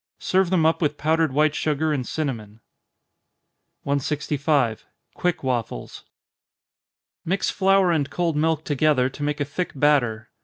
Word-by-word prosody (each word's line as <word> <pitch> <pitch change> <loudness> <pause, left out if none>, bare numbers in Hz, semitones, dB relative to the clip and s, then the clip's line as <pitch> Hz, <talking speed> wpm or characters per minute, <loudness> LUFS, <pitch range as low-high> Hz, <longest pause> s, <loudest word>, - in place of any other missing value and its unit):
Serve 190 -1 +1
them 175 -4 +2
up 160 +2 +2
with 150 -2 0
powdered 160 0 +1
white 150 +2 +2
sugar 155 0 0
and 130 -4 -3
cinnamon. 115 -9 -4 1.2
165. 140 -3 0 0.3
Quick 180 -4 -2
Waffles. 120 - -4 1.2
Mix 190 +4 0
flour 195 -2 +3
and 145 -4 0
cold 170 -3 -1
milk 160 0 +1
together, 145 -3 +2
to 145 - -11
make 145 0 -1
a 145 - 0
thick 150 +6 -4
batter. 125 -6 +1
150 Hz, 130 wpm, -23 LUFS, 135-160 Hz, 1.2 s, flour